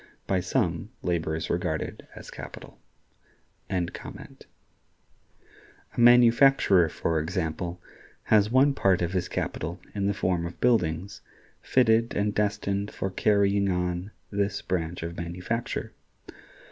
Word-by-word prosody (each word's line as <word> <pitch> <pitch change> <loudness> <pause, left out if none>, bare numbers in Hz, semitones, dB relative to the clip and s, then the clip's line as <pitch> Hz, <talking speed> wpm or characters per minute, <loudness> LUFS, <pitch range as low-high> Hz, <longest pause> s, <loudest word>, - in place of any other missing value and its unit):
By 95 - +1
some, 90 -1 -1
labor 80 -3 -1
is 80 - -3
regarded - - -3
as - - -10
capital.(104) 90 -3 -9 1.5
A - - -4
manufacturer, 120 - +6
for 80 0 -1
example, 85 +1 -3 0.4
has 105 -1 +4
one 135 +4 +4
part 95 -8 +2
of 85 +1 -2
his 90 -2 -1
capital - - -4
in 100 -1 -1
the 100 - 0
form 90 -3 0
of 85 - -11
buildings, 95 -6 +1 0.4
fitted 115 -2 +2
and 105 0 0
destined 100 -1 -1
for 95 - -4
carrying 100 0 +2
on 90 +1 -1 0.2
this 100 -1 -1
branch 85 -2 -2
of 85 +1 -6
manufacture. 90 +7 -4
95 Hz, 115 wpm, -27 LUFS, 85-105 Hz, 1.5 s, manufacturer